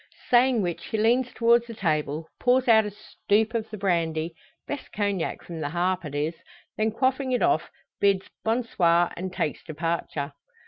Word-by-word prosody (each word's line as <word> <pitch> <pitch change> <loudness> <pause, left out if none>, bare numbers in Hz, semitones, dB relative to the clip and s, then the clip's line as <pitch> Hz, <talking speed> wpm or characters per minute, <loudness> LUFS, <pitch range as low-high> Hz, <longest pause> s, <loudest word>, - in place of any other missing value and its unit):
Saying 245 -2 +5
which 175 -2 -3
he 220 - -2
leans 240 +4 +2
towards 235 0 +3
the 230 - -8
table, 155 -3 -1
pours 255 +1 +3
out 220 -2 +6
a - - -3
stoop 215 +1 -1
of 225 -1 -2
the 215 - -6
brandy 165 -4 0 0.3
best 290 - -6
Cognac 200 -4 -2
from 170 -2 -7
the 145 -2 -2
"Harp" 180 +2 0
it 145 -1 -6
is 150 +3 0 0.4
then 220 +1 +1
quaffing 260 +3 0
it 250 - +1
off, 350 0 +2 0.3
bids 195 -1 +2 0.2
"bon 230 +3 +1
soir!" 175 -5 +2
and 185 +1 -4
takes 155 - -2
departure. 155 -2 -3
200 Hz, 175 wpm, -26 LUFS, 170-235 Hz, 0.4 s, out